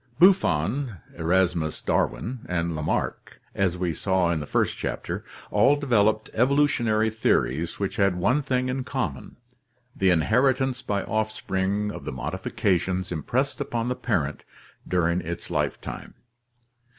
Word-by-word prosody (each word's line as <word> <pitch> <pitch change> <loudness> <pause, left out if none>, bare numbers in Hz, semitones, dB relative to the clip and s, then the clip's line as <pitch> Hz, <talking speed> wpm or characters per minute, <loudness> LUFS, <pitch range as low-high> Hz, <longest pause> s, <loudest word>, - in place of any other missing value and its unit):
— - - -32
Buffon, 130 - +3 0.2
Eramus 85 -2 +1
Darwin, 95 - -1
and 85 -2 -1
Lamarck, 75 -1 -2
as 90 -3 0
we 90 -2 -1
saw 95 0 +1
in 80 - 0
the 75 - -6
first - - +1
chapter, - - -4 0.3
all 105 +8 +5
developed 110 -6 +2
evolutionary 120 -4 +2
theories 85 - 0
which 100 -1 -3
had 100 -3 +3
one 125 +11 +2
thing 130 -2 0
in 130 +1 -2
common, 95 - -4 0.6
the 95 - +3
inheritance 130 - +2
by 100 -5 -1
offspring 105 -2 -1
of - - -8
the - - -4
modifications 90 - -1
impressed 125 - -1
upon 120 0 -2
the 125 - 0
parent 85 - -1 0.4
during 90 0 +1
its 85 +1 -6
lifetime. 75 -3 -3
100 Hz, 130 wpm, -25 LUFS, 85-125 Hz, 0.6 s, all